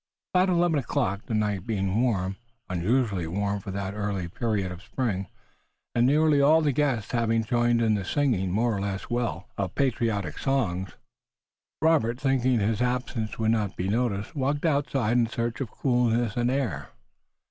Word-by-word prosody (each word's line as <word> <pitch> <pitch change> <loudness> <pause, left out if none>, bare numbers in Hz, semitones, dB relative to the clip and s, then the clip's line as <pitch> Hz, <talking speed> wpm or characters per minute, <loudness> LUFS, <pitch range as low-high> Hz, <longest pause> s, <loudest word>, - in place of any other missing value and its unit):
About 185 +1 +4
eleven 170 -3 +3
o'clock, 100 -5 -2
the 110 - -1
night 105 -3 -1
being 100 -1 0
warm, 95 -6 0 0.3
unusually 95 0 0
warm 100 +3 -1
for 100 - -9
that 100 0 -3
early 100 -4 -2
period 100 0 -2
of 90 0 -8
spring, 100 -3 -2 0.7
and 120 +1 +3
nearly 150 0 +4
all 155 +3 +5
the 150 -2 +2
guests 130 -6 0
having 115 -1 +1
joined 120 +1 +2
in 110 -1 +3
the 100 -2 -1
singing, 115 -5 +1
more 115 +3 +1
or 100 - -2
less 100 +3 -4
well, 120 -1 -2
of 95 -2 -2
patriotic 110 - 0
songs, 95 -10 -1 0.9
Robert, 125 -7 +3
thinking 130 -2 +2
that 100 - +1
his 110 +2 0
absence 125 -3 -2
would 110 0 +2
not 105 -4 0
be 90 - -1
noticed, 110 -1 -1
walked 145 +3 -1
outside 140 -6 +1
in 120 -1 +3
search 115 +2 -3
of 130 - -3
coolness 120 -3 +1
and 120 0 +1
air. 115 - -2
115 Hz, 170 wpm, -26 LUFS, 100-130 Hz, 0.9 s, all